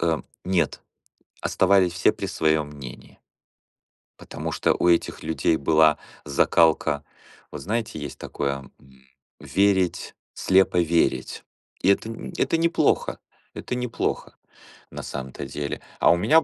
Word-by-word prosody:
Эм, 80 -2 0 0.2
нет. 90 -4 0 0.6
Оставались 95 -2 +3
все 90 - +3
при - - -5
своём 80 -1 +1
мнении. 70 -4 -11 1.0
Потому - - -6
что - - +2
у 90 - +1
этих 85 - +1
людей 80 0 +1
была 80 -1 +4 0.3
закалка. 75 0 +2 0.5
Вот - - -7
знаете, 110 -3 -3
есть 75 -2 -7
такое, 70 -1 -4
м, 65 -1 -21 0.4
верить, 95 +5 +1 0.2
слепо 95 -1 +3
верить. 85 0 0 0.4
И 95 - +3
это 105 +3 +2
нь 115 - -7
это 165 - +1
неплохо, 165 +1 +1 0.3
это - - -5
неплохо 125 -1 -3 0.6
на - - -7
самом-то 65 -1 -6
деле. 70 -1 -5 0.2
А - - +5
у 85 - +4
меня 150 - +4
85 Hz, 130 wpm, -24 LUFS, 75-95 Hz, 1.0 s, А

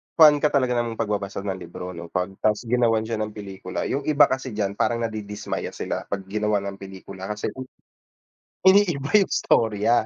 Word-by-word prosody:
fan 150 -2 +8
ka 150 - +3
talaga 130 -4 +1
nang 115 -1 -2
pagbabasa 100 -2 -2
ng 95 -2 -3
libro 90 +1 -7
'no, 85 -1 -8
pag 90 +2 -2
'tas 105 +2 +1
ginawan 115 -2 +2
siya 110 -1 -3
ng 110 0 -3
pelikula. 95 -3 -5
'Yong 140 +1 -2
iba 145 -1 +5
kasi 130 -3 -2
diyan 100 -1 -2
parang 120 0 +1
nadidismaya 105 -2 -4
sila - - -4
pag 100 -1 -3
ginawan 105 -1 0
ng 100 - -11
pelikula 95 0 -9
kasi 105 0 -3
uy, 130 - -5 1.0
iniiba 175 -8 +4
'yong 200 -2 +4
storya. 110 +1 +2
110 Hz, 180 wpm, -24 LUFS, 100-125 Hz, 1.0 s, fan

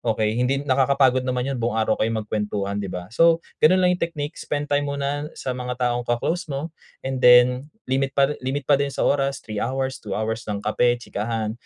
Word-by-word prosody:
okey, 110 0 0
hindi 135 +3 +1
nakakapagod 130 -1 +3
naman 125 -1 0
'yun 130 - -3
buong 115 -1 -1
araw 110 -1 +1
kayong 110 0 0
magkuwentuhan, 105 -1 -2
di 100 - -3
ba? 90 +3 -7
So 165 +6 +4 0.2
gano'n 185 +4 +5
lang 180 - +5
'yung 180 - -4
technique, 155 -2 -3
spend 145 0 -3
time 145 0 +2
muna 140 +1 -2
sa 130 - -4
mga 125 0 -4 0.2
taong 120 0 -3
ka-close 160 +9 -1
mo 150 +3 -4 0.3
and 130 -1 -3
then 125 +2 +6 0.2
limit 135 +1 -1
pa 140 +1 +3
limit 135 +2 -3
pa 140 +1 +3
din 140 0 0
sa - - 0
oras, 140 -1 0
3 105 -2 -5
hours, 130 +2 -2
2 100 -2 -5
hours 110 +1 -3
ng 105 -1 -3
kape, 120 +2 +1
chikahan, 110 0 -3
130 Hz, 205 wpm, -23 LUFS, 115-140 Hz, 0.3 s, then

